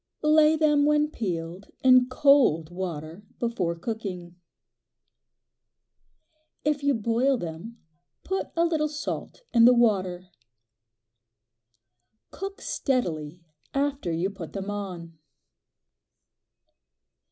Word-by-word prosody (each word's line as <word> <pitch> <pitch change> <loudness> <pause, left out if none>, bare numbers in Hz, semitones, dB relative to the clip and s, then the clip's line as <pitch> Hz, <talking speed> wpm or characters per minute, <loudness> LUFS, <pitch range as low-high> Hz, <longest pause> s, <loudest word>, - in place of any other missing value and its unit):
Lay 305 0 +5
them 295 -2 +3
when 300 0 +2
peeled 175 - -4 0.2
in 255 -1 +6
cold 255 - +3
water 170 -1 -6 0.2
before 200 -8 -1
cooking. 180 -3 -6 2.3
If 295 -1 +1
you 285 -1 +2
boil 235 +5 +1
them 175 +6 -7 0.5
put 385 +1 -2
a 335 0 +3
little 315 -2 +1
salt 300 +10 -6
in 230 -1 +6
the 250 +1 +7
water. 185 -6 +1 2.0
Cook 390 +1 -7
steadily 170 - -2 0.3
after 275 -9 -1
you 170 +4 -1
put 185 -5 -9
them 195 0 -4
on. 175 -5 -7
225 Hz, 95 wpm, -26 LUFS, 175-285 Hz, 2.3 s, the